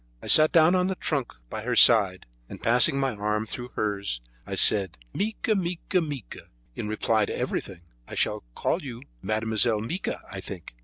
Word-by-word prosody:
I - - -13
sat 155 0 +7
down 165 +1 +5
on 180 0 +2
the 190 - -2
trunk 140 -8 -3
by 110 - -6
her 120 +3 -2
side, 100 -7 +5 0.2
and - - -9
passing 125 +3 +3
my 135 -2 0
arm 105 +1 -2
through 120 +2 -7
hers, 100 - -2 0.3
I - - -4
said: 95 -6 +5 0.2
"Mica! 215 +1 -1
mica! 180 -1 -1
mica! 145 - -7 0.3
in 105 - -5
reply 110 0 +1
to - - -5
everything. 95 -3 -4 0.3
I - - -8
shall - - -1
call - - -1
you 125 -3 -8 0.2
Mademoiselle 110 +1 +1
Mica, 160 - -4
I 100 - -6
think." 90 -7 -9
115 Hz, 175 wpm, -25 LUFS, 105-155 Hz, 0.3 s, sat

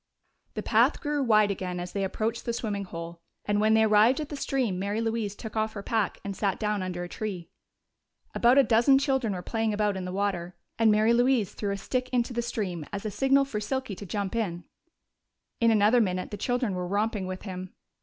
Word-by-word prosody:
The - - -3
path - - +3
grew 295 -2 -1
wide 215 -5 +4
again 180 -2 -4
as 175 0 -5
they 200 - -2
approached 225 +4 -2
the 235 - -1
swimming 205 -4 -3
hole, 170 -1 -8 0.2
and 205 0 +1
when 220 +1 +4
they 220 - +5
arrived 220 +5 +5
at 305 -1 -4
the 295 - -5
stream 255 -9 -1
Mary 200 +3 -1
Louise 225 -3 -2
took 220 +1 -8
off 220 0 0
her 200 - -6
pack 220 -3 -1
and 200 -1 -4
sat 195 -2 0
down 210 -2 0
under 180 -1 -4
a - - -5
tree. 185 -3 -5 0.8
About 245 +3 +4
a 275 - +8
dozen 235 +4 +5
children 265 -6 0
were 180 -1 -5
playing 225 0 -1
about 210 -1 +1
in 185 -1 -4
the 180 - -4
water, 185 -3 -2 0.2
and 225 -1 +5
Mary 215 +2 +4
Louise 245 -4 +2
threw 205 - -3
a 200 - -1
stick 255 +5 -2
into 245 -1 0
the 235 - 0
stream 200 -8 -3
as 200 0 -5
a 215 - -2
signal 270 +6 +3
for 230 -6 -4
Silky 260 +1 -3
to 200 - -8
jump 200 +1 -3
in. 175 -7 -2 1.0
In 230 - +4
another 220 +2 +4
minute 185 -3 -1
the - - -3
children 245 0 -1
were 180 -1 -3
romping 205 0 -1
with 185 0 -6
him. 185 -2 -7
210 Hz, 220 wpm, -27 LUFS, 190-235 Hz, 1.0 s, a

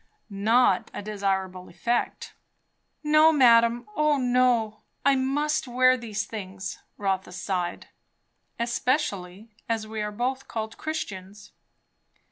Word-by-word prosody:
"Not 205 0 +2
a - - -5
desirable 190 -3 -2
effect." 235 +8 -2 0.7
"No, 305 +1 +6
madame. 235 -4 +5
O 300 -1 +3
no! 245 -4 +2 0.2
I 280 -1 +5
must 295 +3 0
wear 255 +1 +4
these 215 -3 -4
things." 195 -3 -7 0.2
Rotha 195 -1 -2
sighed. 180 -1 -3 0.7
"Especially 235 - -2 0.2
as 225 -1 -1
we 215 0 -5
are 210 0 -3
both 260 +5 -3
called 220 -1 -5
Christians." 205 -9 -6
225 Hz, 105 wpm, -26 LUFS, 200-255 Hz, 0.7 s, No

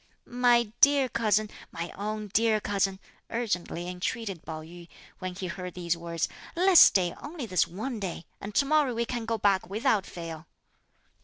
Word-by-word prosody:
"My 240 -2 +3
dear 280 -2 +6
cousin, 215 -3 +1 0.2
my 170 +1 -5
own 210 +1 -4
dear 225 -1 +3
cousin," 195 -2 0 0.3
urgently 180 -7 -2
entreated 180 +1 -4
Pao 155 -1 -6
yü, 170 +1 -12 0.3
when 185 -1 -5
he 190 - -5
heard 180 0 -6
these 170 -1 -1
words, 170 -1 -2 0.3
"let's 360 0 +7
stay 180 -3 +6
only 295 -3 -6
this 185 -5 +2
one 220 +6 -5
day, 180 -4 -5 0.2
and 200 +1 -7
to 280 - +4
morrow 290 -4 +2
we 235 +1 0
can 235 -1 -4
go 225 0 -1
back 195 -3 +2
without 215 -1 +1
fail." 165 -2 -8
205 Hz, 165 wpm, -28 LUFS, 180-235 Hz, 0.3 s, let's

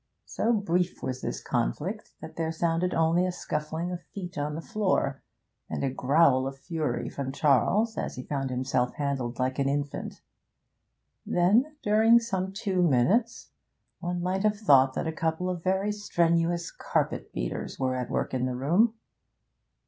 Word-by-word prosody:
So 230 - 0
brief 180 -5 0
was 130 -1 -3
this - - -4
conflict - - -2
that - - -9
there 160 -1 -1
sounded 170 +2 0
only 165 +2 +3
a 185 - 0
scuffling 160 +1 -3
of 180 -1 -5
feet 180 0 -8
on 150 0 -2
the - - -4
floor, 190 - 0 0.5
and - - -3
a 135 - +1
growl 135 0 +3
of 135 0 -6
fury 160 +2 -2
from 135 -1 -4
Charles 175 - +2
as - - -3
he 125 - -6
found 135 -1 -2
himself 125 -1 0
handled 135 -4 -2
like 130 +1 -1
an 135 0 +2
infant; 145 0 -3 1.0
then, 220 +13 +2
during 220 +3 +5
some 190 -5 -1
two 195 -2 -1
minutes, 180 - +2 0.5
one 175 0 -3
might 185 +1 0
have 210 0 +2
thought 135 -10 +5
that - - -2
a 160 - -1
couple 165 +3 -1
of 175 -2 -5
very 190 +2 +1
strenuous 170 -4 +1
carpet - - -2
beaters - - -4
were 130 -1 0
at 125 -1 -3
work - - -2
in 130 0 0
the 125 - -3
room. 180 - +3
165 Hz, 165 wpm, -28 LUFS, 135-190 Hz, 1.0 s, during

